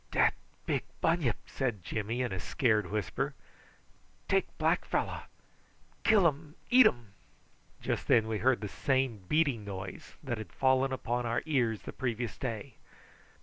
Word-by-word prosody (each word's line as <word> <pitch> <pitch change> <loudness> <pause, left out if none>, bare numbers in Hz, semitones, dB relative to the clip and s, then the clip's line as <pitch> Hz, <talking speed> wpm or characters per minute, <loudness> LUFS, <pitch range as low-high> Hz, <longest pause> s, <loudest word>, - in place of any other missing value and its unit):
"Dat - - +3 0.3
big - - +1 0.2
bunyip," 165 -9 +2
said 120 -9 -2
Jimmy 110 +6 -2
in 125 - -2
a 95 - -3
scared 110 - +1
whisper. 105 -4 -2 0.9
"Take - - +2
black - - +2
fellow - - -1 0.8
kill 210 -5 +5
um, 150 0 0 0.2
eatum." 125 - +5 0.7
Just - - -2
then 110 -1 +4
we 110 -1 -1
heard 120 0 +3
the 105 - -3
same 130 0 0
beating 145 -8 +2
noise 95 -2 -7
that 120 -5 -3
had 110 - -8
fallen 130 0 +2
upon 120 -2 -1
our 115 +1 0
ears 120 -8 +1
the - - -7
previous 120 -3 -2
day. 115 -1 -5
120 Hz, 145 wpm, -31 LUFS, 110-135 Hz, 0.9 s, kill